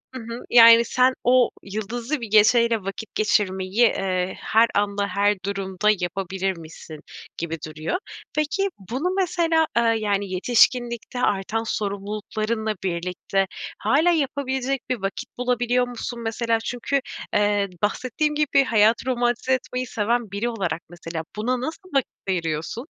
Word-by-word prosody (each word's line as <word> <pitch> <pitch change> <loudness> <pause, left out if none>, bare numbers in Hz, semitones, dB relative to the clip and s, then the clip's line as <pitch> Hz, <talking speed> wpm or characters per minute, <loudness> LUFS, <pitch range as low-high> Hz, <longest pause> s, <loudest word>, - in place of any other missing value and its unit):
Hı 255 - -5
hı. 235 +1 -6
Yani, 230 0 +8
sen 255 +2 +3
o 250 0 +4
yıldızlı 230 +7 -4
bir 230 - -4
geceyle 230 +2 +5
vakit 195 +3 -7
geçirmeyi, 190 -2 0
eee, 190 -5 +1
her 225 +1 +4
anda 200 0 +1
her 200 +2 +2
durumda 195 0 -1
yapabilirmişsin 175 -3 -4 0.4
gibi 165 0 -3
duruyor. 155 - -3 0.4
Peki, 325 +7 0 0.2
bunu 315 +9 -1
mesela, 330 -3 +2
ııı, 230 -1 +3
yani, 205 -2 -1
yetişkinlikte 240 +4 +2
artan 215 +1 0
sorumluluklarınla 215 +1 -2
birlikte 180 +2 -1 0.3
hâlâ 290 +11 +3
yapabilecek 270 -3 -1
bir 250 -5 -1
vakit 200 +6 -5
bulabiliyor 245 0 +1
musun 240 0 -6
mesela? 230 0 0
Çünkü, 245 +4 -1 0.3
eee, 205 -1 +2
bahsettiğin 255 +8 0
gibi 290 -2 +3
hayatı 225 -2 +3
romantize 245 0 0
etmeyi 255 0 -2
seven 225 0 -1
biri 205 +4 -1
olarak 190 -7 -2
mesela 165 -1 -6
buna 245 +4 -1
nasıl 325 +6 -6
vakit 275 -3 +1 0.2
ayırıyorsun? 165 - -2
225 Hz, 130 wpm, -23 LUFS, 195-250 Hz, 0.4 s, Yani